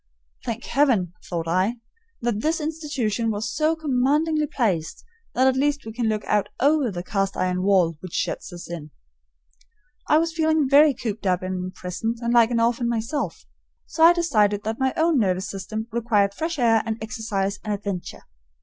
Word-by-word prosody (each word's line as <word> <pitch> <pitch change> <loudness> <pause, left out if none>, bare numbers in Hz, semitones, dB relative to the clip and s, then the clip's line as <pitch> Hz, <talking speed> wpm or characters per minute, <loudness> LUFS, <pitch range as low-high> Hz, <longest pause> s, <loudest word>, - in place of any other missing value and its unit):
"Thank 230 0 -4
Heaven!" 235 - +2 0.2
thought 165 -2 -3
I, 185 +7 +1 0.5
"that 235 -3 -1
this 315 +5 0
institution 290 -8 -2
was 220 +2 -2
so 310 +2 +2
commandingly 300 +2 +1
placed 185 - -2 0.3
that 255 - +3
at 265 -1 +4
least 285 0 0
we 220 - -7
can 235 -1 -1
look 215 -1 -1
out 205 -1 +1
over 285 -2 +3
the 175 -3 -5
cast 195 +1 -1
iron 180 0 0
wall 185 -4 +3
which 185 0 -10
shuts - - -2
us 175 -1 -9
in." 165 -3 -7 1.2
I 305 - +6
was 330 +1 +1
feeling 315 -3 +2
very 285 +1 +6
cooped 220 -3 -4
up 185 0 +1
and 185 -1 -3
imprisoned 185 +5 -4
and 235 0 -1
like 235 -1 +6
an 235 -1 0
orphan 235 +1 +1
myself; 235 +5 -3 0.4
so 320 - -5
I 335 - +10
decided 215 - +2
that 220 +1 -3
my 265 0 +2
own 320 -3 +3
nervous 190 -3 0
system 215 +3 -5
required 215 -4 +1
fresh 325 +8 -3
air 230 -3 +4
and 220 -1 -3
exercise 220 -3 -3
and 215 - -3
adventure. 200 -3 -4
225 Hz, 175 wpm, -24 LUFS, 195-280 Hz, 1.2 s, I